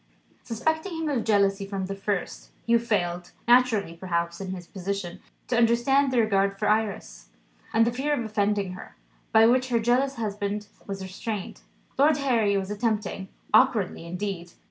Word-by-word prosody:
Suspecting 315 Hz, -, -2 dB
him 320 Hz, -1 st, -2 dB
of 260 Hz, -6 st, 0 dB
jealousy 200 Hz, -2 st, +2 dB
from 195 Hz, -1 st, -3 dB
the 195 Hz, -, -4 dB
first, 195 Hz, -1 st, -3 dB, 0.2 s
Hugh 235 Hz, 0 st, +4 dB
failed 180 Hz, -6 st, -2 dB
naturally 240 Hz, -7 st, +4 dB
perhaps 170 Hz, 0 st, -2 dB
in 190 Hz, -, -5 dB
his 185 Hz, -2 st, -6 dB
position 190 Hz, -1 st, -5 dB, 0.3 s
to 245 Hz, -, 0 dB
understand 240 Hz, +4 st, +3 dB
the 255 Hz, -, 0 dB
regard 195 Hz, -3 st, +2 dB
for 210 Hz, -, -1 dB
Iris, 215 Hz, -1 st, -1 dB, 0.4 s
and 225 Hz, 0 st, +4 dB
the 235 Hz, -, +1 dB
fear 270 Hz, +5 st, -2 dB
of 240 Hz, -, -3 dB
offending 205 Hz, -2 st, 0 dB
her, 185 Hz, -, -10 dB, 0.4 s
by 220 Hz, 0 st, +6 dB
which 255 Hz, +2 st, +3 dB
her 240 Hz, -, +2 dB
jealous 250 Hz, +4 st, +2 dB
husband 210 Hz, -1 st, -3 dB, 0.2 s
was 195 Hz, -1 st, -5 dB
restrained. 195 Hz, +1 st, -5 dB, 0.4 s
Lord 295 Hz, +1 st, +5 dB
Harry 230 Hz, -8 st, +2 dB
was 195 Hz, +1 st, -3 dB
attempting 210 Hz, -3 st, -2 dB, 0.3 s
(awkwardly 220 Hz, -8 st, +3 dB
indeed!) 180 Hz, -1 st, -5 dB
210 Hz, 160 wpm, -26 LUFS, 195-240 Hz, 0.4 s, by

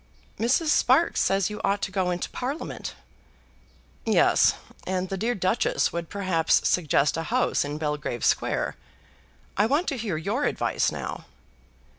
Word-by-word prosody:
"Mrs. 255 Hz, +8 st, +2 dB
Sparkes -, -, +3 dB
says 195 Hz, +1 st, +1 dB
you 210 Hz, -, -6 dB
ought 200 Hz, 0 st, 0 dB
to 190 Hz, -, -2 dB
go 185 Hz, -1 st, 0 dB
into 175 Hz, -1 st, -2 dB
Parliament." 270 Hz, +5 st, -5 dB, 1.1 s
"Yes; -, -, +4 dB, 0.3 s
and 185 Hz, 0 st, -1 dB
the 195 Hz, -, -2 dB
dear 230 Hz, +6 st, -1 dB
Duchess 185 Hz, +3 st, +1 dB
would 170 Hz, -1 st, -4 dB
perhaps 185 Hz, -5 st, +1 dB
suggest 150 Hz, -4 st, +2 dB
a 165 Hz, -, -2 dB
house 250 Hz, +2 st, +1 dB
in 145 Hz, +1 st, -4 dB
Belgrave 150 Hz, -6 st, -2 dB
Square. -, -, 0 dB, 0.8 s
I 210 Hz, +2 st, +4 dB
want 295 Hz, +9 st, +1 dB
to 275 Hz, -, -3 dB
hear 210 Hz, -8 st, -2 dB
your 210 Hz, -, -1 dB
advice -, -, 0 dB
now." -, -, -6 dB
195 Hz, 145 wpm, -26 LUFS, 170-230 Hz, 1.1 s, Yes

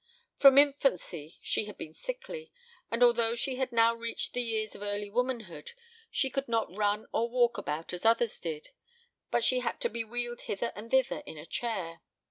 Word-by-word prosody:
From 275 Hz, -1 st, +8 dB
infancy 255 Hz, -, +2 dB
she -, -, +1 dB
had 210 Hz, -, -9 dB
been 155 Hz, -, -8 dB
sickly, -, -, -6 dB, 0.4 s
and 230 Hz, +2 st, +2 dB
although 235 Hz, -1 st, +4 dB
she 255 Hz, +2 st, -1 dB
had 260 Hz, -1 st, -1 dB
now 230 Hz, 0 st, +5 dB
reached 230 Hz, 0 st, -3 dB
the 245 Hz, -, 0 dB
years 220 Hz, -2 st, -2 dB
of -, -, -11 dB
early 205 Hz, 0 st, -3 dB
womanhood, 250 Hz, -, -2 dB, 0.4 s
she 265 Hz, -2 st, 0 dB
could 275 Hz, 0 st, -2 dB
not 225 Hz, -6 st, 0 dB
run 210 Hz, 0 st, +1 dB
or 235 Hz, +1 st, +1 dB
walk 240 Hz, -1 st, +2 dB
about 155 Hz, +4 st, -4 dB
as 180 Hz, -, -4 dB
others 230 Hz, 0 st, +3 dB
did, 160 Hz, -3 st, -5 dB, 0.6 s
but 240 Hz, -, +1 dB
she 255 Hz, -, +3 dB
had 250 Hz, -, -2 dB
to -, -, +1 dB
be 230 Hz, +1 st, -3 dB
wheeled 240 Hz, +1 st, -4 dB
hither 235 Hz, +4 st, -3 dB
and 215 Hz, +3 st, -8 dB
thither 265 Hz, +3 st, +2 dB
in 160 Hz, -, -8 dB
a 150 Hz, -, -9 dB
chair. 180 Hz, -7 st, -3 dB
230 Hz, 190 wpm, -30 LUFS, 205-250 Hz, 0.6 s, From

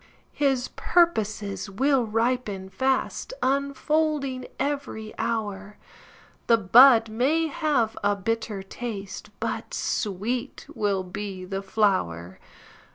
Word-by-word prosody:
His 270 Hz, -3 st, +1 dB
purposes 215 Hz, -, 0 dB
will 260 Hz, +4 st, +2 dB
ripen 225 Hz, -4 st, -1 dB
fast, 265 Hz, -, -1 dB
Unfolding 280 Hz, 0 st, 0 dB
every 275 Hz, -7 st, -3 dB
hour; 205 Hz, -2 st, -3 dB, 0.7 s
The 230 Hz, -, +6 dB
bud 230 Hz, +3 st, +7 dB
may 265 Hz, +9 st, +1 dB
have 290 Hz, -7 st, 0 dB
a 205 Hz, 0 st, +3 dB
bitter 210 Hz, 0 st, -3 dB
taste, 200 Hz, -1 st, -6 dB
But -, -, -3 dB
sweet 230 Hz, +6 st, -2 dB
will 200 Hz, -2 st, 0 dB
be 190 Hz, 0 st, -6 dB
the 195 Hz, +1 st, -4 dB
flower. 185 Hz, -, 0 dB
225 Hz, 95 wpm, -25 LUFS, 200-265 Hz, 0.7 s, bud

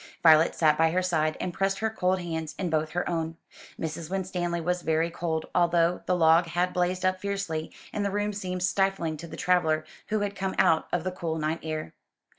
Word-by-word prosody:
Violet 160 Hz, 0 st, +6 dB
sat 155 Hz, -2 st, +3 dB
by 165 Hz, 0 st, +5 dB
her 180 Hz, +3 st, 0 dB
side, 155 Hz, -3 st, +1 dB
and 180 Hz, -, -3 dB
pressed 195 Hz, +2 st, 0 dB
her 220 Hz, +1 st, -1 dB
cold 185 Hz, -3 st, +1 dB
hands 160 Hz, -3 st, -4 dB
in 180 Hz, -4 st, -2 dB
both 155 Hz, 0 st, +1 dB
her 175 Hz, +3 st, -2 dB
own. 165 Hz, -1 st, -2 dB, 0.4 s
Mrs. 160 Hz, 0 st, -4 dB
Winstanley 180 Hz, -2 st, -2 dB
was 180 Hz, +2 st, -1 dB
very 160 Hz, +1 st, +1 dB
cold, 165 Hz, -2 st, -2 dB
although 170 Hz, 0 st, +3 dB
the 180 Hz, -, +3 dB
log 165 Hz, 0 st, +5 dB
had 175 Hz, +2 st, 0 dB
blazed 180 Hz, +1 st, 0 dB
up 185 Hz, 0 st, +1 dB
fiercely, 195 Hz, -6 st, -3 dB, 0.2 s
and 205 Hz, -, -1 dB
the 200 Hz, -, 0 dB
room 205 Hz, +1 st, -1 dB
seemed 185 Hz, -2 st, -3 dB
stifling 195 Hz, -4 st, +1 dB
to 170 Hz, +3 st, -8 dB
the -, -, -9 dB
traveller 160 Hz, -4 st, +2 dB, 0.2 s
who 215 Hz, -1 st, 0 dB
had 205 Hz, -1 st, -2 dB
come 190 Hz, -1 st, -2 dB
out 165 Hz, -4 st, +3 dB
of 175 Hz, -, 0 dB
the 185 Hz, -, -2 dB
cool 170 Hz, -3 st, -3 dB
night 155 Hz, +1 st, -1 dB
air. 155 Hz, -1 st, -4 dB
175 Hz, 210 wpm, -27 LUFS, 160-185 Hz, 0.4 s, Violet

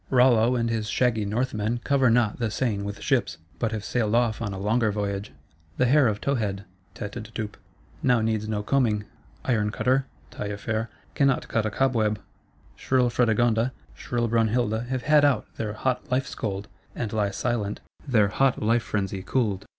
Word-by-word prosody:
Rollo 125 Hz, -2 st, +4 dB
and 115 Hz, -1 st, +1 dB
his 110 Hz, -2 st, -2 dB
shaggy 115 Hz, -4 st, +1 dB
Northmen 110 Hz, +1 st, -1 dB
cover 135 Hz, -3 st, +3 dB
not 115 Hz, -1 st, +2 dB
the 115 Hz, -2 st, 0 dB
Seine 110 Hz, -2 st, -1 dB
with 100 Hz, 0 st, -5 dB
ships; -, -, +1 dB, 0.2 s
but 115 Hz, -2 st, 0 dB
have 110 Hz, -2 st, -4 dB
sailed 110 Hz, 0 st, 0 dB
off 115 Hz, -2 st, +1 dB
on 105 Hz, -3 st, -2 dB
a 95 Hz, -, -5 dB
longer 110 Hz, +3 st, +1 dB
voyage. 100 Hz, 0 st, -3 dB, 0.5 s
The 125 Hz, -, +3 dB
hair 140 Hz, +1 st, +5 dB
of 105 Hz, -1 st, -1 dB
Towhead 105 Hz, -7 st, -1 dB, 0.3 s
(Tête 105 Hz, +3 st, -5 dB
d'étoupes) 110 Hz, -1 st, -5 dB, 0.5 s
now 125 Hz, -2 st, +3 dB
needs 110 Hz, -1 st, -1 dB
no 105 Hz, -1 st, -1 dB
combing; 110 Hz, -4 st, +1 dB, 0.4 s
Iron 110 Hz, -5 st, +1 dB
cutter 130 Hz, +5 st, +1 dB, 0.2 s
(Taillefer) 110 Hz, +2 st, -3 dB, 0.3 s
cannot 140 Hz, -2 st, +2 dB
cut 110 Hz, -1 st, 0 dB
a -, -, 0 dB
cobweb; 110 Hz, -3 st, +1 dB, 0.6 s
shrill 125 Hz, -2 st, +1 dB
Fredegonda, 120 Hz, +1 st, +2 dB, 0.2 s
shrill 120 Hz, -1 st, -2 dB
Brunhilda 115 Hz, 0 st, +1 dB
have 130 Hz, -1 st, -2 dB
had 150 Hz, -1 st, +5 dB
out 145 Hz, -2 st, +3 dB
their 105 Hz, -2 st, -3 dB
hot 130 Hz, +5 st, -2 dB
life 130 Hz, +1 st, +2 dB
scold, 100 Hz, -1 st, -4 dB, 0.3 s
and 115 Hz, -3 st, -3 dB
lie 105 Hz, -2 st, +1 dB
silent, 105 Hz, -1 st, -2 dB, 0.3 s
their 110 Hz, -6 st, +4 dB
hot 135 Hz, +5 st, +2 dB
life 115 Hz, +2 st, +2 dB
frenzy 100 Hz, -3 st, -2 dB
cooled. 100 Hz, -1 st, -1 dB
115 Hz, 165 wpm, -26 LUFS, 105-125 Hz, 0.6 s, hair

